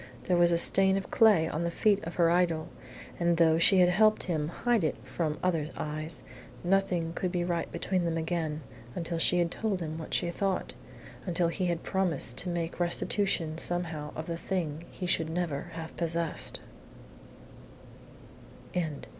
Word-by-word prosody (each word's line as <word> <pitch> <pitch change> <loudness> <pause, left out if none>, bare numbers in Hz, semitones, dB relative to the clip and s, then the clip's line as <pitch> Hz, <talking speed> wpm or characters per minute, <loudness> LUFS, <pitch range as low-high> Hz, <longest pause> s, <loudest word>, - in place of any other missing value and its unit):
There 180 - +1
was 175 0 +4
a 170 - +3
stain 190 +3 +4
of 195 - -5
clay 205 -8 +5
on 160 +1 -2
the 170 - 0
feet 200 +3 +2
of 165 - -6
her 170 -1 +4
idol, 170 -2 +1 0.5
and 170 -1 +2
though 160 -1 +4
she 185 +2 +6
had 180 - +6
helped 215 +4 +4
him 155 -4 -1
to 170 - -7
hide 240 -5 +1
it 155 - +1
from 155 -3 -2
other 165 -4 0
eyes, 155 +1 -3 0.4
nothing 180 -3 +1
could 180 +1 -2
be 175 -1 0
right 170 -1 -2
between 185 -2 -1
them 165 -1 -1
again 160 -2 -2 0.3
until 170 -1 -3
she 180 - +4
had 170 -1 +1
told 210 -4 -1
him 160 -1 -4
what 160 - -3
she 170 - 0
thought 195 +1 -1 0.5
until 170 -1 +1
he 180 +2 -1
had 170 -1 -2
promised 175 -10 0
to 180 - -3
make 170 -1 -3
restitution 175 -2 0
somehow 165 -4 -1
of 155 - -5
the 170 0 -4
thing 165 -3 -3
he 185 - -6
should 165 -2 +1
never 160 -4 -2
have 165 -1 -7
possessed. 170 -1 -2
170 Hz, 170 wpm, -29 LUFS, 160-180 Hz, 0.5 s, she